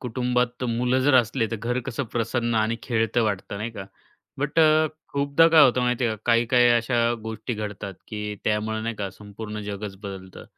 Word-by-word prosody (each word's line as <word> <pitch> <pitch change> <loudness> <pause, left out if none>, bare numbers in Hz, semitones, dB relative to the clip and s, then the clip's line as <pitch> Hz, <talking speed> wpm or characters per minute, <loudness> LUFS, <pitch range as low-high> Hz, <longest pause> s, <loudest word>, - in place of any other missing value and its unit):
कुटुंबात 125 0 0
तर 125 - -1
मुलं 125 +2 +1
जर 140 +1 +3
असले 120 -1 +3
तर 115 - -2
घर 120 +4 -2
कसं 135 +1 -3
प्रसन्न 120 0 -1
आणि 110 +1 +1
खेळतं 115 0 0
वाटतं 100 -2 -2
नाही 110 +3 -4
का. 100 -4 -8 0.5
बट 145 +3 -1
अ, 155 0 +5 0.3
खूपदा 140 +3 +3
काय 160 -2 +7
होतं 125 0 +3
माहिती 125 0 +1
आहे 110 -1 -1
का - - -25
काही-काही 120 +1 +4
अशा 120 0 +2
गोष्टी 110 +1 -5
घडतात 105 -2 -6
की 105 -1 -4
त्यामुळे 110 +1 0
नाही 115 +1 -3
का, 100 -2 -4
संपूर्ण 105 +2 -8
जगच 100 -1 -6
बदलतं. 95 -2 -8
115 Hz, 185 wpm, -24 LUFS, 105-125 Hz, 0.5 s, काय